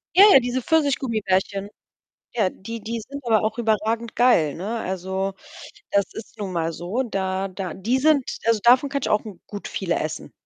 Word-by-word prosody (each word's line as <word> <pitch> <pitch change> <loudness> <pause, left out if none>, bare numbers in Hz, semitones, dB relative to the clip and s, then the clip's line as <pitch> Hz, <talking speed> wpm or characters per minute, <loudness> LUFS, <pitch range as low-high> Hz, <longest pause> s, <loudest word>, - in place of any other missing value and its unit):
Ja, 390 - +9
ja, - - +9
diese 245 +1 -2
Pfirsichgummibärchen. 220 -10 0 0.7
Ja, 215 -6 +2
die 230 +5 -8
die 230 +2 -4
sind 280 +1 -8
aber 220 -2 +3
auch 220 +2 -2
überragend 225 +1 0
geil, 205 - +4
ne? 215 +7 -4
Also, 190 0 -3 0.6
das 200 -1 +3
ist 225 +1 -10
nun 200 -3 -4
mal 165 -1 -1
so, 180 +10 -2
da 195 -4 -2
da 185 -2 -5
die 225 +8 0
sind 290 -1 +3 0.2
also 230 -1 +4
davon 250 +4 +5
kann 280 -1 -2
ich - - -1
auch 210 - +2
n 195 -5 -9
gut 205 -1 -7
viele 175 -3 -1
essen. 155 - -5
215 Hz, 185 wpm, -23 LUFS, 190-240 Hz, 0.7 s, Ja